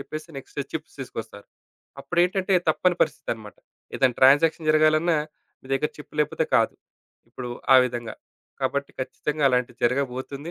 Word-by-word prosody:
జెప్పేసి, 155 Hz, +4 st, -7 dB
next 140 Hz, +1 st, -6 dB
chips 160 Hz, +1 st, -6 dB
తీసుకొస్తారు. 110 Hz, -5 st, -8 dB, 0.6 s
అప్పుడేంటంటే, 180 Hz, +6 st, +1 dB, 0.2 s
తప్పని 175 Hz, +2 st, +1 dB
పరిస్థితనమాట. 110 Hz, -8 st, -4 dB, 0.4 s
ఏదన్నా 125 Hz, -2 st, +2 dB
ట్రాన్సాక్షన్ 155 Hz, +4 st, +5 dB
జరగాలన్నా 155 Hz, +1 st, +3 dB, 0.4 s
మీ -, -, -15 dB
దగ్గర 150 Hz, +3 st, 0 dB
చిప్ 150 Hz, -, -13 dB
లేపోతే 150 Hz, -, -2 dB
కాదు. -, -, +2 dB, 0.6 s
ఇప్పుడు 125 Hz, -1 st, -7 dB, 0.2 s
ఆ -, -, +10 dB
విధంగా. 120 Hz, -2 st, -5 dB, 0.5 s
కాబట్టి 140 Hz, 0 st, -1 dB
ఖచ్చితంగా 145 Hz, +3 st, -2 dB
అలాంటిది 125 Hz, -1 st, -1 dB
జరగబోతుంది. 135 Hz, +4 st, -2 dB
140 Hz, 125 wpm, -24 LUFS, 125-155 Hz, 0.6 s, ఆ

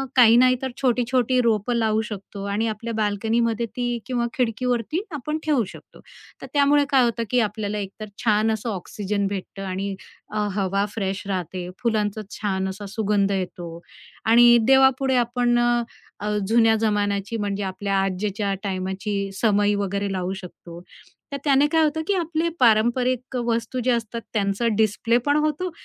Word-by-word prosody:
काही 235 Hz, -2 st, +7 dB
नाही 255 Hz, +1 st, +5 dB
तर 265 Hz, -1 st, -3 dB
छोटी-छोटी 250 Hz, 0 st, +2 dB
रोपं 230 Hz, 0 st, +1 dB
लावू 220 Hz, -2 st, +1 dB
शकतो 200 Hz, -1 st, -7 dB
आणि 220 Hz, +3 st, 0 dB
आपल्या 225 Hz, +2 st, -4 dB
बाल्कनीमध्ये 225 Hz, +2 st, 0 dB
ती 245 Hz, -1 st, -1 dB
किंवा 245 Hz, -2 st, -1 dB
खिडकीवरती 250 Hz, -, -1 dB
आपण 300 Hz, +2 st, -3 dB
ठेवू 290 Hz, -6 st, +2 dB
शकतो. -, -, -14 dB, 0.4 s
तर -, -, -7 dB
त्यामुळे 285 Hz, 0 st, +4 dB
काय 270 Hz, -3 st, +4 dB
होतं, 235 Hz, -1 st, 0 dB
की 250 Hz, -, +2 dB
आपल्याला 210 Hz, -1 st, -1 dB
एकतर 205 Hz, +1 st, -6 dB, 0.2 s
छान 215 Hz, -1 st, +3 dB
असं 220 Hz, +1 st, -3 dB
ऑक्सिजन 200 Hz, +1 st, -3 dB
भेटतं 195 Hz, 0 st, -6 dB
आणि 195 Hz, +1 st, -3 dB, 0.4 s
अ, 215 Hz, -, -2 dB
हवा 195 Hz, 0 st, 0 dB
फ्रेश 195 Hz, -2 st, -3 dB
राहते, 180 Hz, -1 st, -4 dB
फुलांचं 215 Hz, -3 st, 0 dB
छान 190 Hz, -2 st, -2 dB
असा 200 Hz, +2 st, -7 dB
सुगंध 205 Hz, -1 st, 0 dB
येतो. 175 Hz, -3 st, -4 dB, 0.5 s
आणि 240 Hz, +1 st, +7 dB
देवापुढे 265 Hz, 0 st, +4 dB
आपण 240 Hz, 0 st, +1 dB
अ, 240 Hz, 0 st, +2 dB, 0.4 s
अ, 210 Hz, -, -3 dB, 0.2 s
जुन्या 225 Hz, 0 st, +4 dB
जमान्याची, 205 Hz, 0 st, 0 dB
म्हणजे 205 Hz, -1 st, -2 dB
आपल्या 195 Hz, +1 st, -2 dB
आज्यांच्या 200 Hz, +1 st, -1 dB
टाईमाची 195 Hz, +1 st, -3 dB
समई 205 Hz, 0 st, +2 dB
वगैरे 200 Hz, 0 st, -2 dB
लावू 185 Hz, 0 st, -2 dB
शकतो. 175 Hz, -2 st, -10 dB, 0.5 s
तर 280 Hz, -, -3 dB
त्याने 280 Hz, 0 st, +4 dB
काय 320 Hz, +1 st, +3 dB
होतं, 310 Hz, +1 st, 0 dB
की 405 Hz, -, +2 dB
आपले 335 Hz, -1 st, -1 dB
पारंपरिक 245 Hz, +2 st, +2 dB
वस्तू 235 Hz, +2 st, -1 dB
जे 255 Hz, -, +3 dB
असतात 230 Hz, -1 st, -2 dB
त्यांचा 205 Hz, +2 st, 0 dB
डिस्प्ले 220 Hz, +2 st, +2 dB
पण 290 Hz, 0 st, +3 dB
होतो 310 Hz, +4 st, -2 dB
220 Hz, 155 wpm, -23 LUFS, 200-245 Hz, 0.5 s, काही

